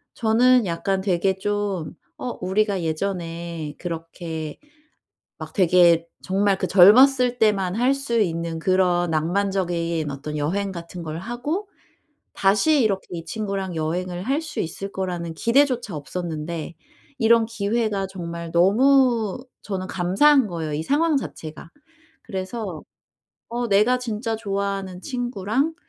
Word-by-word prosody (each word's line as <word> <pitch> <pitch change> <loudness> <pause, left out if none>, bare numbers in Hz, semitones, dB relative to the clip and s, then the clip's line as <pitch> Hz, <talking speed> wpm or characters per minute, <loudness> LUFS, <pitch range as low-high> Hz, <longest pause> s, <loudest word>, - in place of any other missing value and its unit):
저는 240 +1 +4
약간 190 +3 -1
되게 190 0 +1
좀 205 -4 -2 0.3
어 250 - -4
우리가 195 0 0
예전에 165 -2 -4
그렇게 165 -2 -6 0.8
막 - - -8
되게 175 -3 +4 0.2
정말 195 +1 +2
그 185 - -1
젊었을 245 +7 +6
때만 200 -5 +2
할 250 +3 +3
수 275 -4 -1
있는 165 -4 -1
그런 180 -1 +2
낭만적인 170 -1 -1
어떤 145 +2 -6
여행 195 +7 -1
같은 170 0 -8
걸 160 -1 -5
하고 265 - -4 0.7
다시 210 +10 +3
이렇게 195 -3 0
이 170 -1 -6
친구랑 195 -4 -3
여행을 175 +3 -2
할 275 +7 0
수 310 -2 -6
있을 195 +4 -5
거라는 175 -4 -4
기대조차 245 - +2
없었는데 165 +1 -5 0.5
이런 230 0 +5
기회가 215 -2 -1
정말 170 -3 -6
너무 235 +4 +3 0.2
저는 185 -2 -4
감사한 215 +10 +3
거예요, 165 -4 -4
이 150 - -1
상황 300 - +2
자체가. 160 - -7 0.5
그래서 190 -4 -5 0.7
"어 240 +1 -2
내가 220 +5 +3
진짜 225 -1 -3
좋아하는 195 -3 -3
친구랑 245 - -2
195 Hz, 260 characters per minute, -23 LUFS, 170-230 Hz, 0.8 s, 젊었을